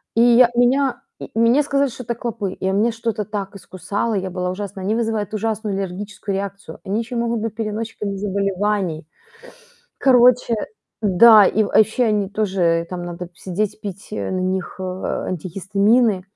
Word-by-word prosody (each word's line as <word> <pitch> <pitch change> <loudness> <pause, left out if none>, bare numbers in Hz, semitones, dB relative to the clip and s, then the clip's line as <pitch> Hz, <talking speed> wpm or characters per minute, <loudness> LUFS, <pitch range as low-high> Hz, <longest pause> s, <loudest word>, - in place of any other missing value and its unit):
и 230 - +4
я 240 0 +6
меня 245 +1 +2 0.2
м - - -8
мне 230 +6 +3
сказали, 280 -1 +1
что 250 - -9
это 235 - -2
клопы, 225 -5 -4
и 190 - -3
у - - 0
меня 215 +4 +2
что-то 225 -2 -3
так 200 -1 -5
искусало, 200 +4 -3
и 200 - 0
я 190 - -4
была 180 0 -3
ужасна. 195 0 -6
Они 200 +3 0
вызывают 220 -3 -2
ужасную 215 -1 -2
аллергическую 195 +1 -4
реакцию, 200 +1 -6
они 200 +3 -1
ещё 235 +2 -5
и - - 0
могут 235 0 -1
быть 220 -1 -4
переносчиками 215 -2 -4
заболеваний. 195 -4 -1 0.9
Короче, 250 -2 +4 0.5
да, 210 +2 +7
и, 215 - +2
э, - - -2
вообще 220 +5 +3
они 210 -3 +1
тоже 185 -5 0
там 180 -1 -5
надо 175 0 -6
сидеть, 205 +5 -3
пить, 200 -2 -7
э, - - -3
на 185 - -1
них, 185 0 -2
э, - - -6
антигистамины. 195 +4 0
205 Hz, 170 wpm, -20 LUFS, 190-230 Hz, 0.9 s, да